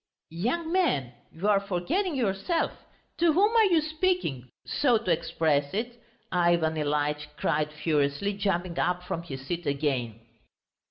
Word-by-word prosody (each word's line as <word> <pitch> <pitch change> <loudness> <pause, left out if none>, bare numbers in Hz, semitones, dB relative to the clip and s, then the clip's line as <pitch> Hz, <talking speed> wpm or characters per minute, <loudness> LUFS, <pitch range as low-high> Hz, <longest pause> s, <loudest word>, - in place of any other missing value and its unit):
"Young 260 - -1
man, 230 - +1 0.2
you 175 +6 -3
are 205 -2 +5
forgetting 255 - -1
yourself! 240 - 0 0.5
To 335 -2 +4
whom 410 +7 +3
are 450 -1 +6
you 345 -5 +4
speaking, 310 - -1 0.2
so 250 -5 +2
to 215 -5 -2
express 150 -2 +1
it?" 235 +2 -4 0.3
Ivan 170 -3 +2
Ilyitch 150 0 -1
cried 150 -1 0
furiously, 150 +4 0
jumping 185 -3 -1
up 180 0 0
from 170 -2 -3
his 135 -5 -8
seat 170 +2 -4
again. 135 -6 -1
180 Hz, 140 wpm, -27 LUFS, -, 0.5 s, are